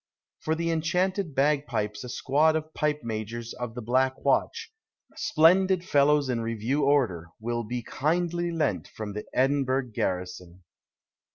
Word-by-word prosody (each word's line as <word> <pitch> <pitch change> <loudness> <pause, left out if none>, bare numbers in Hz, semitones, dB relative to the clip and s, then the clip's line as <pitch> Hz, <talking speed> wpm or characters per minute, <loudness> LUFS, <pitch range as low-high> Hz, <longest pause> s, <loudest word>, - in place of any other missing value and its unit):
For 160 - -1
the 165 +1 -1
enchanted 175 +1 0
bag 145 +1 +2
pipes 105 +1 -3
a 125 - -7
squad 150 +6 +2
of 155 0 -3
pipe 150 0 0
majors 115 +1 -5
of 120 -2 -6
the 125 - -6
Black 130 +3 +1
Watch, - - 0 0.4
splendid 180 +3 +3
follows 145 -1 +3
in 120 -2 -1
review 115 +5 -1
order, 120 - +2
will 120 +1 -2
be 120 +2 -4
kindly 175 +6 -1
lent 105 - -1
from 105 0 -7
the 105 - -5
Edinburgh 135 -1 +1
garrison. 90 -1 -4
135 Hz, 145 wpm, -27 LUFS, 115-155 Hz, 0.4 s, splendid